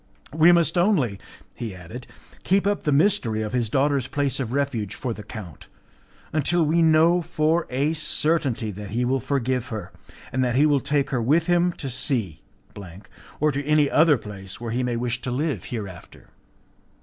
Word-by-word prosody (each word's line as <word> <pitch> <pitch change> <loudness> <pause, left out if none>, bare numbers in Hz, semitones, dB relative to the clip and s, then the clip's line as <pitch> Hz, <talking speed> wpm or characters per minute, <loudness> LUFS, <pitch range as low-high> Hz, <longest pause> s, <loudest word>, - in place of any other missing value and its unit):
"We 160 +2 +6
must 170 0 +3
only," 150 - +1 0.3
he 110 -5 -6
added, 90 +8 -10 0.4
"keep 195 +1 +2
up 205 0 0
the 150 - +2
mystery 140 - +2
of 105 +1 -5
his 120 -3 0
daughter's 140 0 +1
place 140 -2 -1
of 120 -4 -3
refuge 125 -7 -2
for 125 -3 -3
the 110 - -9
count, 100 - -10 0.7
until 165 +3 +2
we 165 +3 +2
know 165 +2 +4
for 160 +1 0
a 140 +5 0
certainty 150 -7 0
that 105 +1 -8
he 120 +4 -1
will 130 +2 +1
forgive 130 -1 -1
her, 105 -6 -6 0.4
and 130 0 0
that 120 -1 0
he 145 +3 +4
will 145 -2 +3
take 140 +1 -1
her 125 -3 0
with 155 +8 +2
him 175 0 +2
to 140 - -6
C, 120 - -1 1.0
or 150 +1 +2
to 140 +1 -3
any 150 0 +2
other 155 -2 +5
place 95 -3 -8
where 115 -1 -5
he 125 +3 -1
may 125 -1 -1
wish 120 +1 -2
to - - -4
live 130 - -2
hereafter." 100 -7 -8
135 Hz, 180 wpm, -24 LUFS, 115-155 Hz, 1.0 s, We